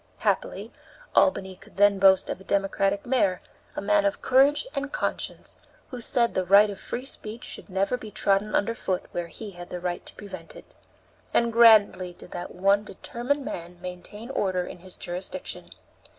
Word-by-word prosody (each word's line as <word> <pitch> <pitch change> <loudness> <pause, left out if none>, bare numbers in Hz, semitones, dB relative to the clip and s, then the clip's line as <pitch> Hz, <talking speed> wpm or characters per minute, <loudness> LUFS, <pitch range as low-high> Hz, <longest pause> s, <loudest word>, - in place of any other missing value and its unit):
Happily, - - -1 0.4
Albany 190 -9 +3
could 195 +3 -19
then 205 -1 +5
boast 190 -1 +5
of - - -5
a - - -12
Democratic 195 +1 0
mayor, 210 -8 +2 0.4
a - - -3
man 205 0 +3
of 200 0 0
courage 275 - +4
and 275 +1 -3
conscience, - - -3 0.4
who 250 -2 -5
said 235 0 +1
the 185 - +1
right 200 +3 +6
of 200 - -9
free 250 - -5
speech 225 -3 -6
should - - -8
never 195 +6 0
be 220 -3 -9
trodden 200 +1 +1
under 230 +3 +1
foot 185 -5 -2
where 175 -1 -3
he 210 +4 -8
had 175 -1 -10
the 180 - -5
right 175 0 -3
to - - -12
prevent 185 -5 -10
it. - - -14 0.6
And 235 -1 +3
grandly 215 -6 +6
did - - -13
that 175 - -5
one 195 +3 +3
determined 245 +7 -3
man 175 +1 -6
maintain 185 +6 -7
order 185 -7 0
in - - -9
his 185 +1 -10
jurisdiction. 180 +2 -6
200 Hz, 180 wpm, -26 LUFS, 185-230 Hz, 0.6 s, right